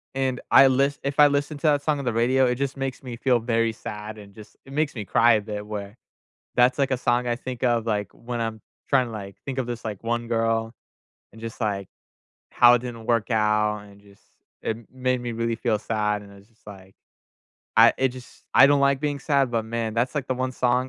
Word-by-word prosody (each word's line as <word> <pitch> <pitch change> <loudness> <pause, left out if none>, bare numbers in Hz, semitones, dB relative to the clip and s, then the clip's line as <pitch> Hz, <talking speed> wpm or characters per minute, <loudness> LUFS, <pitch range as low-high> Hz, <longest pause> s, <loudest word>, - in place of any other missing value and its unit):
and 130 -2 -1
I 135 0 +8
list 140 +2 +1
if 140 +1 -3
I 145 - +9
listen 145 +1 -1
to - - -25
that 145 -1 +3
song 150 -2 0
on 135 - -5
the 120 - 0
radio, 130 +3 +3
it 125 - +1
just 140 +1 -3
makes 135 0 -4
me 120 -2 -7
feel 125 -1 +2
very 115 -1 0
sad 105 0 -7
and 100 -1 -13
just 105 -1 -14
it 135 - -13
makes 150 -2 0
me 105 - -4
cry 120 +5 +4
a 105 - 0
bit 105 0 -6
where 105 0 -6 0.6
That's, 125 +3 +4
like, 135 - +2
a 130 - +1
song 120 0 +1
I 120 0 0
think 125 -2 -7
of, 120 -2 +2
like, 105 -4 -1
when 120 0 -5
I'm 115 -1 -3 0.3
tryna, 130 -4 +3
like, 100 -2 -8
think 135 -1 -3
of 120 - -7
this, 115 -1 -6
like, 105 -3 -5
1 120 0 -1
girl, 115 0 0 0.6
and 115 - -15
just, 115 +1 -8
like, 100 -3 -1 0.7
how 120 0 +7
it - - +1
didn't 115 -2 -7
work 115 0 +1
out, 105 -1 +2
and 100 - -17
just 100 -1 -21 0.4
it 110 - -2 0.2
made 130 0 0
me 120 -1 -4
really 115 0 -1
feel 110 -3 0
sad, 105 -2 -1
and 100 - -14
I - - -14
was 100 - -18
just 115 -2 -33
like, 95 -1 -13 0.8
I - - +8
it 135 - +4
just 125 - -14
I 135 - +9
don't 145 0 +3
like 140 0 +3
being 145 -2 -2
sad, 140 -4 +1
but, 115 -1 0
man, 115 -1 -2
that's, 120 +5 0
like, 140 - -1
the - - +1
1 130 0 -2
song 125 +1 +1
120 Hz, 235 wpm, -24 LUFS, 110-130 Hz, 0.8 s, I